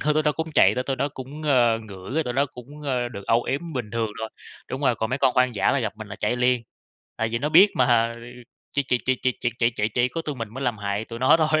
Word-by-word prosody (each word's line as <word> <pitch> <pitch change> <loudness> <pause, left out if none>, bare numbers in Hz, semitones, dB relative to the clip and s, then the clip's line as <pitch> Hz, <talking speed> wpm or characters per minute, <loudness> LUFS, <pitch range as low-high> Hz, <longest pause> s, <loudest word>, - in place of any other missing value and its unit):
hơn 150 0 +1
nữa 155 - +3
nó 150 - +3
cũng 160 +2 -4
chạy 95 +2 +6
rồi 125 - -1
tụi 135 - -2
nó 135 +3 0
cũng, 140 +2 -9
ơ, 120 -6 +3
ngửi 100 -4 -10
cái 160 - +2
tụi 125 -4 -3
đó 140 +3 +2
cũng, 140 +2 -12
ơ, 125 -4 -1
được 100 -4 -9
âu 115 +1 +3
yếm 160 +4 -3
bình 120 -7 -4
thường 115 -1 -1
thôi, 110 - -3 0.4
đúng 130 - -3
rồi, 135 -4 +3
còn 110 +1 -2
mấy 130 - 0
con 130 - +3
hoang 125 -1 +3
dã 100 - +2
là 140 - +2
gặp 110 -4 -2
mình 110 -1 -9
là 105 - -7
chạy 120 - 0
liền, 125 -1 +2 0.5
tại 115 0 0
vì 115 - -1
nó 145 +5 -1
biết 185 +6 +7
mà, 120 -2 +3
ừ, 115 - -11 0.5
chỉ 140 - +1
chỉ 125 -2 0
chỉ 130 - +3
chỉ 130 - +2
chỉ 120 - 0
chỉ 115 0 +3
chỉ 105 -2 -1
chỉ 125 0 +3
có 165 +6 -4
tụi 150 -3 -4
mình 115 -4 -5
mới 135 +1 -4
làm 120 -4 -1
hại 100 +1 -2
tụi 115 0 -8
nó 130 +5 +5
thôi 155 -1 +2
125 Hz, 300 wpm, -24 LUFS, 115-140 Hz, 0.5 s, biết